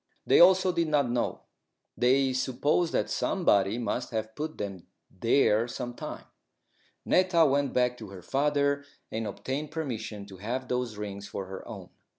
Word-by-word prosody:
They - - +5
also 185 +1 +6
did 170 -2 0
not 145 -5 +2
know. 120 0 -1 0.5
They 130 +2 +3
supposed 135 +6 +1
that - - 0
somebody 105 - +2
must 120 +1 -2
have 110 -1 -3
put 155 +5 -5
them 95 -4 -6 0.2
there 115 +2 +2
some 120 0 -5
time. - - -7 0.8
Netta 180 -3 +4
went 140 -1 +2
back 125 -1 +2
to 110 - -8
her 95 -2 -10
father 140 +3 +1 0.3
and 110 0 -3
obtained 135 +8 -4
permission 115 -9 -5
to 95 -2 -12
have 125 +7 -4
those 125 -4 -2
rings 100 -1 -6
for 100 - -5
her 95 0 -8
own. - - -9
125 Hz, 160 wpm, -28 LUFS, 105-145 Hz, 0.8 s, also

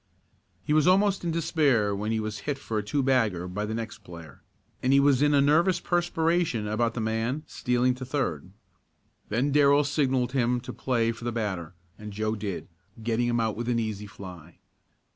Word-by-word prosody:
He 150 - 0
was 155 +1 +4
almost 195 +1 +3
in 170 - -1
despair 145 -10 +1
when 105 +2 -2
he 110 - 0
was 110 -1 -4
hit 140 - -1
for 115 -5 -3
a - - -4
two 135 +7 -1
bagger 110 -10 +1
by 105 +4 -3
the 110 - -3
next 115 -1 -5
player, 85 -4 -12 0.4
and 130 - +1
he 140 - +6
was 140 -2 +4
in 145 0 +4
a 140 - +5
nervous 165 +6 +3
perspiration 170 -7 0
about 115 +2 0
the - - -2
man 115 +6 -1
stealing 125 +1 0
to 130 +1 -8
third. 125 - -2 0.8
Then 125 +7 0
Darrell 145 0 +5
signalled 130 -4 0
him 125 -2 +1
to 130 - -7
play 115 -3 0
for 115 0 -10
the 120 - -1
batter, 95 -7 -3 0.2
and 105 0 -8
Joe 110 +1 -1
did, 100 -4 -5 0.4
getting 115 +1 0
him 120 0 +1
out 110 -2 0
with 120 +2 -3
an 120 - +1
easy 105 -2 -3
fly. 90 -4 -11
120 Hz, 195 wpm, -27 LUFS, 105-140 Hz, 0.8 s, he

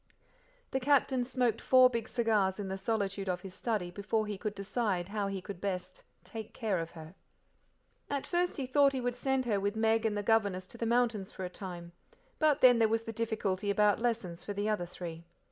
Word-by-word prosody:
The 265 - 0
Captain 265 -1 +3
smoked 245 -3 0
four 255 -1 +7
big 235 -2 -3
cigars 215 -5 +1
in 200 -2 -3
the 190 - -2
solitude 200 -2 -1
of 180 0 -1
his 190 -1 -9
study 200 -3 -2
before 210 +3 -1
he 210 -1 -3
could 205 +2 -4
decide 200 -3 -1
how 205 -1 -1
he 195 -2 -4
could 195 -3 -8
best 185 -2 -4 0.2
"take 220 -2 -8
care 215 -7 0
of 165 0 -4
her." 160 +1 -10 1.0
At 280 -1 -2
first 355 0 0
he 275 - -2
thought 275 +2 +4
he 265 - -1
would 245 0 -1
send 265 0 0
her 210 -4 +1
with 200 +2 -1
Meg 225 0 +2
and 215 -2 0
the 205 - -2
governess 200 -4 +2
to - - -11
the 230 - -1
mountains 235 -5 +1
for 190 - -5
a 180 - -6
time, 175 -3 -7 0.5
but 305 -2 +3
then 245 -2 +7
there 225 - +5
was 225 +1 +1
the 225 - -6
difficulty 210 -3 -1
about 205 0 +3
lessons 220 -8 -1
for 205 - -4
the 205 +1 -2
other 210 -5 0
three. 170 -2 -7
215 Hz, 215 wpm, -32 LUFS, 190-240 Hz, 1.0 s, four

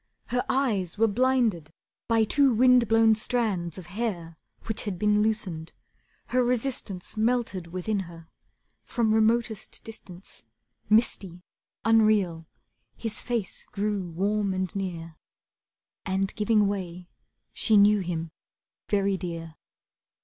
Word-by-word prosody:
Her 250 0 0
eyes 210 -10 0
were 225 - +4
blinded 230 - +1 0.4
by 225 -1 +3
two 275 +5 +3
wind 250 0 +5
blown 225 0 +5
strands 215 -7 -1
Of 185 - -8
hair 175 -4 -4 0.3
which 220 - -2
had 200 -4 -3
been 210 +2 +2
loosened. 195 -7 -2 0.6
Her 255 - +2
resistance 240 -7 -2
Melted 220 -6 0
within 185 +4 -2
her, 170 -3 -9 0.6
from 225 -3 0
remotest 220 0 0
distance, 195 -4 -11 0.5
Misty, 195 -5 +1 0.4
unreal, 210 -7 +3 0.5
his 225 -2 -5
face 235 -6 -4
grew 200 -3 -2
warm 200 +3 0
and 185 +1 -3
near, 170 -4 -5 0.9
And 195 0 -1
giving 210 -1 +2
way 180 -3 -4 0.5
she 220 - +3
knew 205 +1 +6
him 165 -3 -4 0.6
very 200 -1 +1
dear. 165 -3 -6
205 Hz, 115 wpm, -27 LUFS, 180-225 Hz, 0.9 s, knew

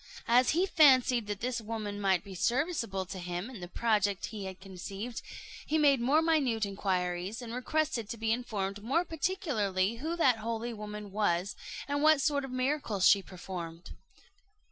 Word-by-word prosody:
As 245 +1 +5
he 365 - +4
fancied 260 - +5
that 205 -1 -4
this 245 -1 -1
woman 210 -2 -4
might 190 -3 +2
be 195 - -10
serviceable 235 - 0
to 185 +1 -7
him 180 +6 -4
in 235 - -9
the 175 - -7
project 205 -1 +1
he 205 -2 -5
had 190 -1 -7
conceived, 195 +4 -6 0.4
he 315 - 0
made 280 -4 +4
more 290 +6 +3
minute 270 -10 +2
inquiries, 190 0 -2
and 235 -2 -7
requested 255 -3 -1
to 230 - -5
be 220 0 0
informed 205 -4 -2
more 305 +10 +1
particularly 260 - -1
who 320 +7 -3
that 265 -9 +4
holy 230 +1 -3
woman 210 -1 -7
was, 195 -2 0 0.3
and 285 0 -1
what 310 -1 +6
sort 285 0 +1
of 270 - -5
miracles 255 -6 +1
she 200 - +6
performed. 175 -2 -8
225 Hz, 165 wpm, -31 LUFS, 195-265 Hz, 0.4 s, what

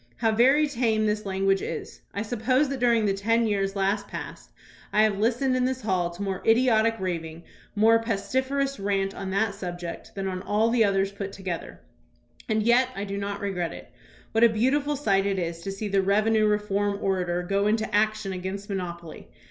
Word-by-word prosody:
How 225 - +2
very 265 +7 +4
tame 230 -5 +1
this 210 -1 -1
lan 190 0 -2
guage 195 0 +3
is. - - -6
I 200 - -3
suppose 250 +5 +1
that 275 -1 -3
during 235 -3 +3
the 200 - +2
ten 230 +4 +1
years 195 -2 0
last 200 +1 0
past - - -8 0.4
I 215 - +4
have 210 -2 +1
listened 245 +4 +1
in 250 0 +1
this 260 -1 -2
hall 185 -4 0
to 175 +3 -7
more 195 -2 -3
idiotic 225 -1 +3
raving, 165 -3 -4 0.3
more 225 +2 +5
pestiferous 260 +5 -1
rant 195 -1 0
on 195 -1 -5
that 200 +2 0
subject 175 -3 -7
than 195 -1 -3
on 185 -1 -3
all 215 +3 +1
the 235 -1 +4
others 195 -1 +1
put 200 -1 -6
together. 190 -4 -6 0.7
And 215 -1 +1
yet 245 +3 +4
I 195 - -3
do 200 -1 -4
not 200 0 -4
regret 180 -4 -2
it. - - -11 0.4
What 225 +1 +2
a 235 - +8
beautiful 275 +7 +1
sight 200 -8 +1
it 195 -1 0
is 170 -2 -3
to 195 +3 -5
see 200 +2 -4
the 195 -1 +2
revenue 215 +3 +3
reform 205 -1 0
orator 180 -3 -1
go 200 +3 +1
into 220 +1 0
action 215 -1 +1
against 190 +2 -5
monopoly. 175 -4 -6
205 Hz, 195 wpm, -26 LUFS, 195-225 Hz, 0.7 s, a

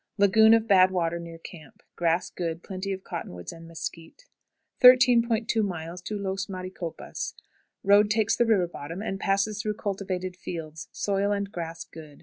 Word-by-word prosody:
Lagoon 220 +3 +6
of 225 0 0
bad 190 -3 +6
water 170 -2 -1
near 170 -1 -9
camp. 160 -3 -13
Grass 170 0 0
good; 170 -1 -4
plenty 190 +1 -5
of 190 0 -5
cottonwood 90 - -7
and 165 0 -12
mesquite. 165 - -8 0.6
13.20. 220 -8 +3
Los 195 +1 -2
Maricopas. 185 -3 -6 0.5
Road 205 +1 +5
takes 215 0 +2
the 240 - +2
river 195 -6 +3
bottom, 170 +3 -7
and 195 -3 -3
passes 200 +2 0
through 210 -1 -2
cultivated 190 -3 -4
fields; 160 -3 -7
soil 200 0 0
and 200 -1 -2
grass 165 -3 -5
good. 155 -3 -13
190 Hz, 145 wpm, -26 LUFS, 170-210 Hz, 0.6 s, Lagoon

